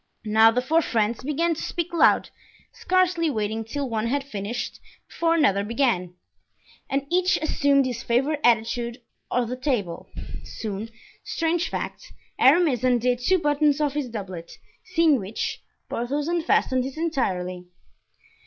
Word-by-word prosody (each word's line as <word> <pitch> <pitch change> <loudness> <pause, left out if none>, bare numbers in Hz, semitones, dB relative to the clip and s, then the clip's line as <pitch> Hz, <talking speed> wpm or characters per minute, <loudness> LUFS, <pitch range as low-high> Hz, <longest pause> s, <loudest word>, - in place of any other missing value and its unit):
Now 220 +1 +6
the 245 +2 0
four 320 +6 +3
friends 225 -4 0
began 320 +4 +1
to 320 - -6
speak 345 0 -3
loud, 335 - +4 0.4
scarcely 365 -3 +1
waiting 220 -3 -2
till 275 +5 -4
one 225 -1 -1
had 280 +3 0
finished 230 -2 -5 0.3
before 330 0 +1
another 200 - +3
began, 210 -6 0 0.7
and 275 +1 -1
each 365 +1 +3
assumed 285 -3 +2
his 245 -3 -3
favorite 270 +6 +1
attitude 235 +1 +1 0.3
on 250 - +1
or - - +1
at 230 - -5
the 250 - -4
table. 235 - -2 0.3
Soon—strange 230 - -4
fact—Aramis 280 -4 +1
undid 245 -1 +2
two 370 +10 +3
buttons 295 -2 +2
of 295 -2 +1
his 290 -4 -2
doublet, 190 -7 -7 0.3
seeing 330 -6 +3
which, 200 +2 -4 0.3
Porthos 280 +5 -2
unfastened 320 -6 +1
his 270 +3 -6
entirely. 185 - -2
255 Hz, 135 wpm, -24 LUFS, 225-310 Hz, 0.7 s, Now